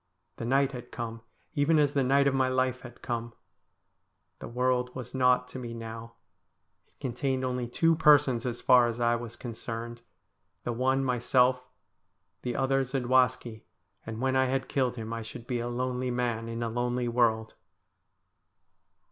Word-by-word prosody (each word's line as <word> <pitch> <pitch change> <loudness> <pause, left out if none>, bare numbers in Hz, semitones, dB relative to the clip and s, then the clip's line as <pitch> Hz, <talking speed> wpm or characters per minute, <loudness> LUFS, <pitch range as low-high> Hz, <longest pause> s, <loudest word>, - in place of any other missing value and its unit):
The - - -4
night 135 +2 +2
had 125 -2 -9
come, 115 -1 -5 0.3
even 155 +1 +3
as 145 -1 +3
the 140 - +2
night 140 +2 +3
of 140 - +3
my 130 -1 +2
life 130 0 0
had 120 -1 -12
come. 120 -1 -3 1.1
The - - -7
world 125 +1 0
was 125 -2 -7
naught 125 -1 +3
to 130 - -7
me 120 -2 -6
now. 115 0 -8 0.7
It - - -39
contained 130 +1 -1
only 125 -1 -2
two 165 +7 +2
persons 145 -6 +5
as 120 -1 -3
far 125 -1 +6
as 120 0 -4
I 120 0 +3
was 120 -1 -6
concerned. 115 0 -6 0.6
The 120 - -2
one 130 +3 +1
myself, 125 0 +2 0.8
the 125 -1 -3
other 135 0 +2
Zadwaski, 125 -3 +1 0.4
and 110 0 -6
when 130 +1 +1
I 130 0 +4
had 130 0 -1
killed 130 -3 0
him 115 -1 -5
I 115 - -4
should 115 +1 -9
be 125 -1 -2
a 120 - -3
lonely 125 +1 -2
man 120 -2 -2
in 115 +1 -3
a 115 - -1
lonely 120 +1 -1
world. 115 -2 +1
125 Hz, 165 wpm, -29 LUFS, 120-130 Hz, 1.1 s, far